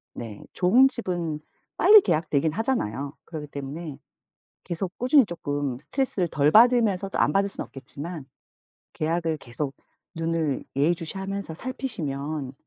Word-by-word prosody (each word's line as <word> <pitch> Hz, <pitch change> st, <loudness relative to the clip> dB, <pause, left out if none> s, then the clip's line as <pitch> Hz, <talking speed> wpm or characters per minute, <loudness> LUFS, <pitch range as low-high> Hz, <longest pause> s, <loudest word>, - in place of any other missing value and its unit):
네. 110 Hz, -4 st, -7 dB
좋은 240 Hz, +9 st, +5 dB
집은 175 Hz, -, -2 dB, 0.4 s
빨리 425 Hz, 0 st, +8 dB
계약되긴 155 Hz, -, +1 dB
하잖아요. 150 Hz, -, -1 dB
그렇기 155 Hz, -3 st, -7 dB
때문에 145 Hz, +2 st, -6 dB, 0.7 s
계속 180 Hz, +2 st, -4 dB
꾸준히 255 Hz, +1 st, +5 dB
조금 145 Hz, -6 st, -3 dB
스트레스를 205 Hz, -, -1 dB
덜 150 Hz, -2 st, +2 dB
받으면서 220 Hz, -4 st, +5 dB
또 -, -, -4 dB
안 150 Hz, -, +3 dB
받을 200 Hz, +2 st, +2 dB
순 -, -, -5 dB
없겠지만 145 Hz, +4 st, -8 dB, 0.7 s
계약을 165 Hz, 0 st, 0 dB
계속 135 Hz, +2 st, -5 dB, 0.4 s
눈을 165 Hz, -4 st, -1 dB
예의 150 Hz, +5 st, +3 dB
주시하면서 190 Hz, +1 st, -5 dB
살피시면 155 Hz, -, -4 dB
165 Hz, 310 characters per minute, -25 LUFS, 145-195 Hz, 0.7 s, 빨리